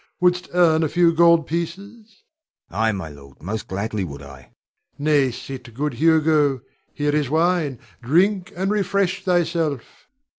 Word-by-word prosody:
Wouldst 180 0 +1
earn 165 -3 +4
a 160 - 0
few 170 0 +3
gold 170 -1 +5
pieces? 195 +6 -6 0.4
Hugo. - - -32
Ay, 110 0 +3
my 95 -6 -5
lord, 70 -2 -15
most 105 +4 -4
gladly 100 +1 -3
would 70 -5 -8
I. 70 -1 -11
Rod. 65 - -20 0.5
Nay, 145 -2 +2
sit, 125 0 -8
good 145 +2 -2
Hugo. 150 -2 +2 0.3
Here 145 0 -1
is 150 -4 0
wine; 160 -3 +1 0.2
drink, 180 - +1
and 190 +3 -1
refresh 200 -2 0
thyself. 165 -6 -1
155 Hz, 150 wpm, -22 LUFS, 125-175 Hz, 0.5 s, gold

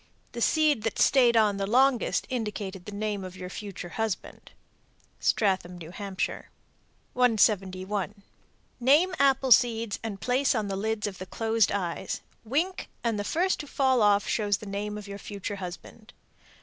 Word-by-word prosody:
The 235 - -6
seed 305 -3 +3
that 225 0 -2
stayed 245 -4 +5
on 210 -2 +3
the 195 0 -2
longest 255 +2 +3
indicated 205 -6 -4
the 210 - -7
name 205 -1 -3
of 185 0 -8
your 180 0 -7
future 195 -4 -7
husband." 220 0 -4 0.7
Stratham, 190 -4 +1
N.H. 185 +3 -3 0.9
171. 200 -4 +1 0.6
Name 295 +9 +4
apple 270 -1 +3
seeds 230 -3 +4
and 215 -3 -5
place 255 +4 +1
on 215 -3 -1
the 195 - -2
lids 215 +2 -2
of 195 -3 -5
the 185 - -7
closed 225 -1 +1
eyes. 180 -4 -3 0.2
Wink 320 +11 -1
and 230 -3 0
the - - -1
first 360 - 0
to 295 - -6
fall 260 -3 +2
off 205 -1 +4
shows 205 -3 +1
the 215 - -10
name 205 +1 -4
of 210 -1 -8
your 200 0 -7
future 200 0 -6
husband. 195 +5 -9
210 Hz, 155 wpm, -27 LUFS, 195-245 Hz, 0.9 s, stayed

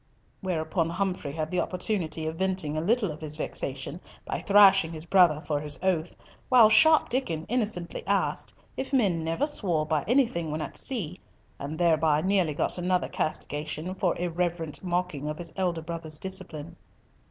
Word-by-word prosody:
Whereupon 165 -2 -1
Humfrey 180 -4 -2
had 155 0 -3
the 180 - 0
opportunity 180 -4 -2
of 160 +1 -3
venting 185 -4 -1
a 155 - 0
little 210 +1 +1
of 155 - -9
his 155 -1 -2
vexation 140 +2 -4 0.2
by - - -3
thrashing 195 -4 +6
his 155 0 -7
brother 175 -5 +5
for 150 -2 -2
his 145 -1 -1
oath, 175 -3 0 0.3
while 240 -4 +7
sharp 315 +6 +6
Diccon 175 -11 -2
innocently 210 -8 -2
asked - - 0 0.2
if 265 - -4
men 195 -11 +2
never 165 - 0
swore 180 - 0
by 155 -2 0
anything 230 - +2
when 155 +1 -3
at 155 - -5
sea, 185 - -3 0.4
and 145 +3 -5
thereby 160 -3 +3
nearly 185 -4 +1
got 180 - 0
another 180 0 0
castigation 155 +3 -3
for 185 -2 0
irreverent 170 -2 -2
mocking 175 -5 -2
of 150 0 -3
his 170 -2 -6
elder 175 -4 -1
brother's 160 -2 -4
discipline. 170 -3 -5
170 Hz, 165 wpm, -27 LUFS, 155-190 Hz, 0.4 s, while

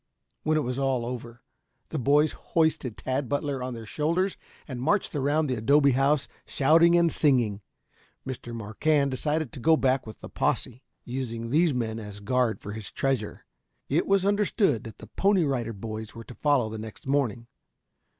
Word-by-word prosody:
When 155 0 +1
all 155 - +1
was 125 +1 -3
over, 120 -3 -2 0.5
the 155 - -3
boys 145 +4 +3
hoisted 160 -8 0
Tad 130 -1 -2
Butler 145 -2 -1
on 125 -1 -4
their 115 -1 -8
shoulders 170 - 0 0.3
and 130 -4 -5
marched 195 +9 +1
around 145 +3 +1
the 130 - -1
adobe 140 +5 +4
house 135 +2 +2 0.2
shouting 165 +5 +5
and 170 -1 +3
singing. 120 -9 +2 0.6
Mr. 130 -2 -6
Marquand 135 +6 0
decided 150 +2 -1
to 140 - -8
go 160 +6 +4
back 130 -3 +1
with 110 - -10
the - - -7
posse, 125 +1 -1 0.2
using 115 -2 -4
these 160 -1 +3
men 115 -2 -2
as 105 -2 -8
a - - -12
guard 125 +1 +1
for 105 - -7
his 110 -1 -7
treasure. 130 -6 -2 0.4
It 150 +5 +1
was 195 -1 +3
understood 200 - +2
that 110 -3 -9
the - - -11
Pony 195 -2 +2
Rider 125 -5 -1
Boys 110 +1 -7
were 115 - -8
to 125 - -11
follow 140 -4 +2
the 110 0 -6
next 110 -1 -9
morning. 135 -4 0
130 Hz, 175 wpm, -27 LUFS, 115-150 Hz, 0.6 s, shouting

